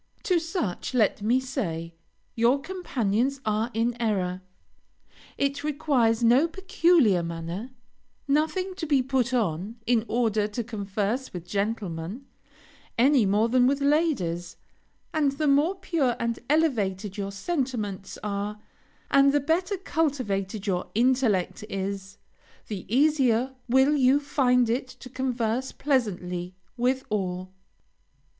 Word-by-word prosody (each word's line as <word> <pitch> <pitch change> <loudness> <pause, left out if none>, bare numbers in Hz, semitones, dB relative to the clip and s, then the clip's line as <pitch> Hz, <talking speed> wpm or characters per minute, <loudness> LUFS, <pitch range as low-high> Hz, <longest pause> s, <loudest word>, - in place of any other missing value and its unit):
To 360 -3 +2
such, 325 - -3
let 215 -3 +2
me 235 +5 +3
say, 170 - -4 0.4
your 235 +4 +3
companions 275 - -1
are 215 +2 0
in 235 +1 0
error; 185 -5 0 1.0
it 280 0 -1
requires 270 -7 +1
no 250 +7 +5
peculiar 335 - +3
manner, 170 +7 -5 0.6
nothing 315 +7 +1
to 330 -4 -4
be 280 -3 +3
put 260 -1 0
on, 205 -3 -1
in 230 -2 +2
order 220 -3 +1
to 225 +3 -4
converse 215 +3 -3
with 175 -2 -6
gentlemen, 200 +1 -3 0.7
any 255 -2 +4
more 210 +3 +3
than 250 +1 +4
with 275 +1 +1
ladies; 280 - 0 0.6
and 295 -4 +2
the 305 +2 -2
more 295 +6 +3
pure 330 -10 0
and 235 0 -1
elevated 210 - +1
your 200 -1 -4
sentiments 215 - -3
are, 205 0 -3 0.5
and 275 0 +6
the 290 - +3
better 350 +7 0
cultivated 250 - -1
your 185 -3 -1
intellect 235 -6 +2
is, 195 0 -4 0.5
the 200 -4 -5
easier 265 -2 +3 0.2
will 265 +4 +4
you 270 0 +4
find 250 -4 +2
it 245 +3 -1
to 255 0 -12
converse 255 -1 -1
pleasantly 180 -10 -1 0.2
with 255 +2 +1
all. 185 -2 -2
240 Hz, 125 wpm, -26 LUFS, 200-280 Hz, 1.0 s, and